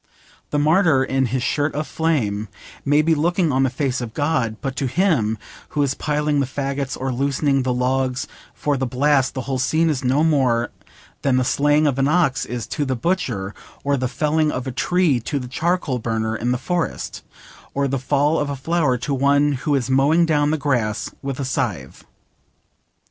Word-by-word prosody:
The 150 - -1
martyr 155 -2 +4
in 135 -1 0
his 125 +1 -2
'shirt 145 +3 0
of 150 +1 -1
flame' 115 -13 -1 0.4
may 145 +2 +3
be 165 +1 +3
looking 165 +2 +1
on 130 0 +2
the 135 - +3
face 130 0 -2
of 115 -2 -6
God, 145 -7 0
but 135 -2 -4
to 135 - 0
him 130 - +1 0.4
who 145 - +4
is 140 -1 +1
piling 150 0 0
the 135 - 0
faggots 135 0 -3
or 130 0 -2
loosening 140 +1 +1
the 130 0 -1
logs 130 +1 0 0.3
for 145 -2 0
the 130 0 -1
blast 135 +1 +2
the 130 - -2
whole 130 0 -3
scene 160 +6 +2
is 135 -4 -3
no 130 +4 +2
more 130 -7 +2 0.5
than 135 -2 +2
the 130 - +2
slaying 145 +4 +2
of 140 -2 +1
an 135 - +3
ox 150 -5 +2
is 120 -1 -4
to 150 - -2
the 130 -2 -1
butcher, 115 - -1 0.3
or 140 0 +1
the 130 -1 -1
felling 155 +3 +1
of 125 0 -4
a 130 - -3
tree 170 0 +2
to 130 +5 -3
the 125 -2 -4
charcoal 155 -1 -1
burner 110 -1 -1
in 120 +2 -1
the 125 - +1
forest, 175 +6 -3 0.5
or 140 0 +1
the 135 0 -1
fall 145 +4 +1
of 145 - -1
a 140 - -2
flower 145 -1 +1
to 140 +4 -3
one 140 +2 +3
who 145 +2 0
is 130 -2 -1
mowing 145 +6 +4
down 150 -2 +2
the 155 - +1
grass 120 -7 -1
with 135 -1 -4
a 140 - -2
scythe. 105 - -3
135 Hz, 195 wpm, -21 LUFS, 125-150 Hz, 0.5 s, martyr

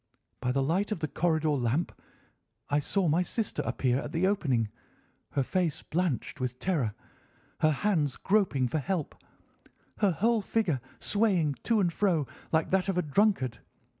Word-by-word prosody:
By 125 - 0
the 135 +1 +1
light 185 +9 0
of 215 - 0
the 155 - -2
corridor 160 -1 +1
lamp 135 +4 0 0.8
I 145 - +4
saw 185 +5 0
my 160 +3 +3
sister 215 +4 -2
appear 125 0 0
at - - -6
the 170 +3 +1
opening, 140 - +1 0.6
her 140 - +2
face 175 +1 -1
blanched 170 -5 -2
with 125 -1 -2
terror, 140 - -1 0.6
her 155 - +4
hands 155 -4 +1
groping 190 -11 +2
for 155 +6 -1
help, 170 +1 -2 0.9
her 205 - +4
whole 220 +7 +2
figure 190 - 0 0.2
swaying 185 -9 +1
to 230 -2 +3
and 175 -4 +1
fro 175 -8 +2 0.3
like 160 -1 +1
that 190 0 +2
of 190 - 0
a 180 - +2
drunkard. 145 - +1
165 Hz, 160 wpm, -29 LUFS, 140-195 Hz, 0.9 s, I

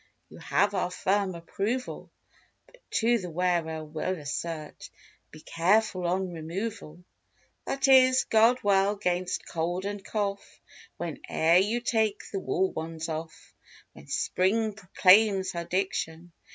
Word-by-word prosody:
You - - -13
have 205 0 +1
our 180 - 0
firm 190 +1 0
approval. 205 +9 -4 0.6
But - - -22
to 235 +1 +2
the 180 -3 -6
wearer 165 -2 -1
we'll 160 +4 -3
assert— 155 +1 -6 0.4
Be 155 - -14
careful 185 +2 +1
on 185 +1 -1
removal; 170 0 -6 0.6
That 275 0 0
is, 255 -1 +6
guard 230 +3 +3
well 200 0 +3
'gainst 180 -2 -2
cold 175 +3 -2
and 205 -1 -4
cough 200 -1 -4 0.4
When - - -5
e'er 165 +2 +4
you 215 +6 +1
take 220 -3 -1
the 195 - -2
wool 190 0 0
ones 160 0 -5
off. 160 0 -7 0.4
When - - -15
Spring 215 +4 0
proclaims 195 0 +4
her 170 -1 -5
diction. 175 -2 -3
185 Hz, 130 wpm, -27 LUFS, 170-210 Hz, 0.6 s, is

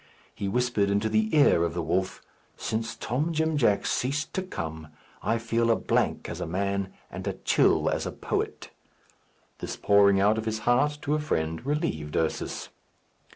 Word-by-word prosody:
He 100 - -4
whispered 120 -2 +1
into 100 +2 +1
the 110 0 +2
ear 140 - +5
of 85 0 -2
the 85 - -1
wolf, 95 +4 -1 0.3
"Since 115 +1 -3
Tom 145 +8 -1
Jim 160 0 +1
Jack 115 -8 +2
ceased 140 +4 -1
to 190 - -1
come, 80 - -6 0.3
I 115 - +1
feel 115 0 0
a 115 - +5
blank - - 0
as 85 - -6
a 90 - -3
man, 100 +2 -1 0.2
and - - -6
a - - 0
chill - - +3
as - - 0
a - - -3
poet." - - -3 0.9
This - - -4
pouring 100 -1 +4
out 105 +3 +3
of 110 - -5
his 110 0 -1
heart 145 +5 +3
to 145 -1 0
a 155 - +2
friend 80 - -2
relieved 110 - -2
Ursus. 80 -1 -2
110 Hz, 175 wpm, -27 LUFS, 95-125 Hz, 0.9 s, ear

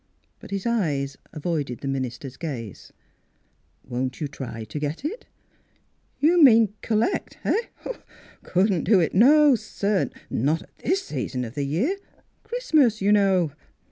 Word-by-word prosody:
But - - -12
his 195 -1 -3
eyes 150 -13 0 0.2
avoided 150 -6 -3
the 140 - -4
minister's 130 -1 -4
gaze. 125 - -7 0.9
"Won't 130 +1 -3
you 150 - -2
try 130 -5 -7
to 110 +7 -6
get 150 - -4
it? 420 +11 -5 0.3
" - - -40
" - - -43
You 335 +4 +4
mean 225 -6 +6
collect 225 - -1
— - - -29
eh.? 460 - +1 0.8
Couldn't 185 -1 +1
do 200 0 +5
it; 165 - +1
no, 290 +7 +6
sir; 210 -3 -1 0.2
not 150 +7 0
at - - -24
this 385 +3 0
season 125 -3 -3
of 115 - -8
the 145 0 -2
year. 230 - 0 0.5
Christmas, 320 - +2
you 200 +1 +2
know. 190 -6 +3
180 Hz, 150 wpm, -24 LUFS, -, 0.9 s, mean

